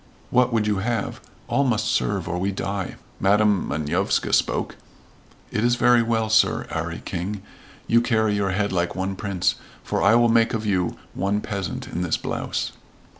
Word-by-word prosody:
"What 125 0 +3
would 110 -2 +1
you 105 -1 +1
have? 110 +2 -2 0.3
All 140 - +2
must 110 -5 +1
serve 100 -4 0
or 90 +1 -2
we 95 +2 0
die." 100 0 -3 0.2
Madam 105 -1 +3
Manovska 75 0 0
spoke, - - +1 0.8
"It 105 - -1
is 120 0 +2
well, 115 -2 +3
Sir 110 0 +3
'Arry - - -4
King, 95 +3 -4 0.4
you 115 0 +4
carry 110 -3 +1
your 100 -1 0
head 100 +2 0
like 85 -2 -1
one 95 +1 -2
prince, 95 -2 0 0.3
for - - -1
I 100 +3 +5
will 120 0 +5
make 115 0 +3
of 110 -1 -3
you 90 -4 0 0.2
one 100 +2 0
peasant 100 -4 -4
in 90 - -4
this 90 -3 0
blouse." - - -3
105 Hz, 170 wpm, -23 LUFS, 95-115 Hz, 0.8 s, I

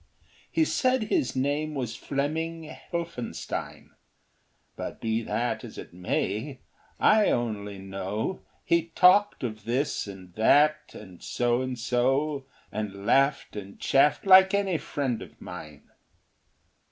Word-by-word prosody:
He 325 -1 +3
said 255 -5 +1
his 290 - 0
name 145 +3 -1
was 120 -4 -3
Fleming 160 +4 -2
Helphenstine, 165 -5 -6 0.8
But - - -6
be 110 0 0
that 115 +2 -2
as - - -10
it - - -9
may; 105 +8 -2 0.4
I 215 -1 +5
only 105 -4 -2
know 95 - -4 0.2
He 170 -1 +2
talked 195 -1 +5
of 110 -4 -5
this 125 0 -1
and 95 -3 -10
that 150 - +3
and 95 -4 -12
So 120 0 0
and 130 -1 -3
So, 135 +4 0 0.2
And 100 -2 -5
laughed 140 +1 +2
and 100 -1 -8
chaffed 140 +6 +3
like 190 +1 +8
any 195 -5 +1
friend 130 -5 -2
of - - -12
mine. 75 -2 -9
130 Hz, 125 wpm, -27 LUFS, 110-160 Hz, 0.8 s, like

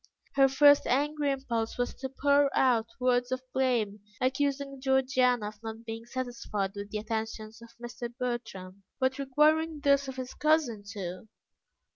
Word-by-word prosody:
Her 270 -1 +5
first 285 +1 +6
angry 290 +2 +1
impulse 235 -4 -2
was 245 0 -1
to 265 - -4
pour 280 +1 +3
out 235 -4 +3
words 250 0 +1
of 255 0 -2
blame, 240 -6 +1 0.2
accusing 275 +1 -1
Georgiana 255 -4 +2
of 210 0 -17
not 225 0 -7
being 225 +1 -7
satisfied 240 -6 -3
with 200 0 -7
the 215 - -3
attentions 220 0 -5
of 235 0 -14
Mr. 240 0 -6
Bertram, 220 -6 -5 0.2
but 260 +1 0
requiring 305 +3 +2
those 280 -1 +3
of 265 - -6
his 255 -1 -6
cousin 300 -9 +1
too. 185 -1 -6
250 Hz, 150 wpm, -29 LUFS, 225-275 Hz, 0.2 s, first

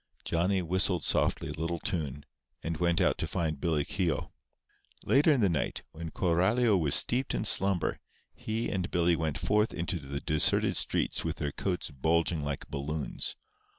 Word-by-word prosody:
Johnny 90 +3 +1
whistled 90 0 +1
softly - - 0
a - - -3
little 85 +2 -3
tune, 75 -5 -3 0.4
and 80 0 -3
went 85 0 +1
out - - +2
to - - -1
find 80 -4 -2
Billy 80 -4 0
Keogh. 90 -4 -2 0.7
Later 145 +4 +4
in 135 -5 +2
the 100 - +4
night, 85 -5 -2
when 80 +1 -7
Coralio 95 +8 +2
was 80 -6 +4
steeped 125 +2 +3
in - - -2
slumber, 95 -4 +3 0.3
he 110 +2 -3
and 90 -2 -2
Billy 85 -1 +2
went 80 -3 -2
forth 105 +2 +1
into 85 +1 -2
the 70 -1 -5
deserted 75 +1 +2
streets - - 0
with - - -2
their 75 - -3
coats 90 -2 -3
bulging 80 +3 0
like 70 -1 -4
balloons. 70 +2 -4
85 Hz, 165 wpm, -29 LUFS, 75-95 Hz, 0.7 s, Later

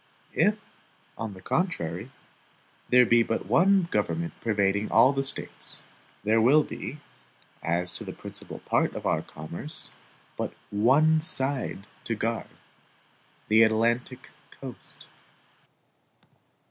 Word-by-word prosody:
If, 210 +1 +2 0.6
on 110 -3 -6
the 95 - -14
contrary, 100 - -2 0.8
there 125 0 +6
be 115 +1 +4
but 115 -3 -2
one 185 - +3
government 170 0 -2
pervading 100 -2 0
all 130 +5 +5
the 135 - -1
States, 135 - -5 0.4
there 110 +2 +2
will 145 +7 +5
be, 150 - -7 0.6
as 90 +2 -1
to - - -4
the - - -7
principal - - -8
part - - 0
of - - -7
our - - +1
commerce, 85 - +4 0.5
but - - -4 0.2
ONE 140 +10 +3
SIDE 135 - 0 0.2
to 115 - -2
guard 115 +1 -3 1.0
the 110 +1 +4
ATLANTIC 115 +3 0 0.2
COAST. 130 -3 -11
115 Hz, 115 wpm, -26 LUFS, 105-140 Hz, 1.0 s, there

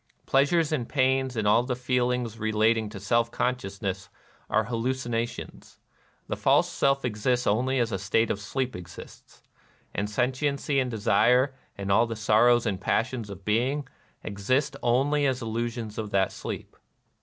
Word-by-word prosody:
Pleasures 145 +4 +2
and 130 -7 -2
pains 130 -2 +1
and 105 -1 0
all 110 +3 +5
the 125 0 -2
feelings 125 -2 -1
re 110 0 -1
lating 110 0 +2
to 105 -1 -8
seK 115 +4 +1
consciousness 100 -6 -3 0.4
are 110 - +2
hallucinations. 120 0 -3 0.5
The - - -2
false - - +3
self 135 -1 +1
exists 125 +2 0
only 130 +6 +1
as 120 -2 +1
a 95 - -2
state 105 +4 +1
of 100 - -2
sleep 130 +3 -3
exists; 90 -1 -12 0.5
and 105 +1 -2
sentiency 135 +4 0
and 130 -1 0
desire, 125 +5 +3 0.2
and 100 0 -3
all 115 +4 +4
the 115 - -4
sorrows 115 +3 +4
and 95 -2 -2
passions 115 +1 -1
of 100 -1 -10
being, 125 +6 0 0.4
exist 130 +8 -1
only 140 +4 +2
as 130 -2 0
illusions 115 -1 -4
of 110 -1 -4
that 95 -1 +1
sleep. - - -7
120 Hz, 155 wpm, -27 LUFS, 105-130 Hz, 0.5 s, all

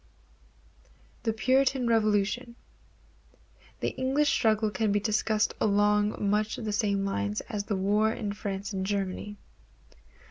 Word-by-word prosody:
The 225 - 0
Puritan 260 +3 +2
Revolution. 225 +1 +1 1.3
The - - +1
English 270 +3 +1
struggle 215 -1 +2
can 205 +2 0
be 205 - +2
discussed 215 0 +1
along 210 0 +2
much 210 +1 +1
the 220 -3 -4
same 200 -2 0
lines 100 - -2
as 205 -1 -5
the 210 - -1
wars 210 +3 +1
in 205 -2 -3
France 200 0 -5
and 190 -1 -2
Germany. 200 +1 -3
210 Hz, 120 wpm, -28 LUFS, 200-220 Hz, 1.3 s, Puritan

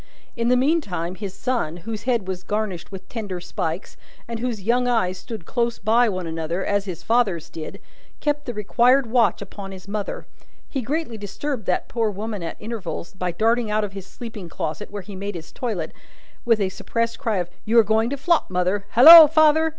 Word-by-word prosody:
In 235 0 -1
the 250 +1 +4
meantime, 225 - 0
his 195 0 -6
son, 215 -10 -2
whose 225 -1 -5
head 235 -7 0
was 185 -1 -4
garnished 205 -3 -3
with 190 -1 -9
tenderer 205 -6 -5
spikes, 165 +1 -4 0.3
and 230 -1 -5
whose 230 -4 -3
young 245 +4 +2
eyes 185 -7 +1
stood 195 -1 -8
close 235 +2 -1
by 230 +3 +3
one 185 -3 -3
another, 165 +2 -3
as 200 -1 0
his 180 -5 -6
father's 220 -9 +1
did, 160 -1 -7 0.4
kept 295 0 -1
the 245 - -3
required 245 +6 +3
watch 225 -5 +2
upon 195 -1 -9
his 190 0 -11
mother. 205 0 -4 0.4
He 270 - -3
greatly 260 -2 -3
disturbed 220 +4 -4
that - - 0
poor 230 -2 0
woman 210 0 -5
at 165 - -5
intervals, 210 -6 -5
by 180 -2 -2
darting 225 +5 +1
out 215 0 +1
of 200 -2 -4
his 195 -1 -8
sleeping 215 -7 -8
closet, 165 +5 -4
where 205 -1 -6
he 205 0 -9
made 200 +1 -5
his 160 -2 -8
toilet, 205 -11 -3 0.5
with 230 -2 +3
a 195 -2 +1
suppressed 230 +4 -3
cry 225 -7 0
of 175 -1 -3
"You 225 +2 +1
are 230 - +8
going 220 +2 +2
to 280 - -3
flop, 335 +4 +1
mother. 185 +2 0
Halloa, 315 +6 +11
father!" 315 +1 +4
215 Hz, 195 wpm, -23 LUFS, 185-240 Hz, 0.5 s, Halloa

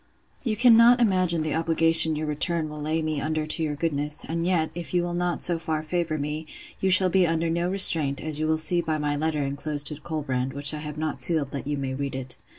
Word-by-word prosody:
'You 220 -4 -2
cannot 240 +1 +5
imagine 185 -7 +1
the 155 - -3
obligation 165 0 +4
your 155 +1 -4
return 155 +2 -1
will 150 0 -8
lay 155 +2 -2
me 155 -2 -3
under 155 0 -2
to 155 +2 -1
your 150 -2 -2
goodness; 150 0 -2
and 165 +1 -3
yet, 165 -4 0
if 175 +1 -7
you 175 - +1
will 175 0 -4
not 175 0 -1
so 170 -2 +1
far 155 -2 -3
favour 160 -1 -3
me, 150 +2 -5 0.3
you 190 - 0
shall 185 0 +5
be 185 0 +3
under 165 0 -1
no 170 +1 -1
restraint, 165 -7 +5
as 155 -1 -2
you 155 - -1
will 160 0 +1
see 165 +2 0
by 160 -2 -3
my 150 -1 -2
letter 150 0 -2
enclosed 145 +1 -3
to 150 - -9
Colbrand; 135 -5 -4
which 140 +2 +2
I 150 - -5
have 150 0 -8
not 155 0 -4
sealed, 155 -5 +1
that 140 0 -6
you 145 0 -2
may 135 -1 -4
read 140 0 -5
it. 130 -2 -5
155 Hz, 240 wpm, -24 LUFS, 150-170 Hz, 0.3 s, cannot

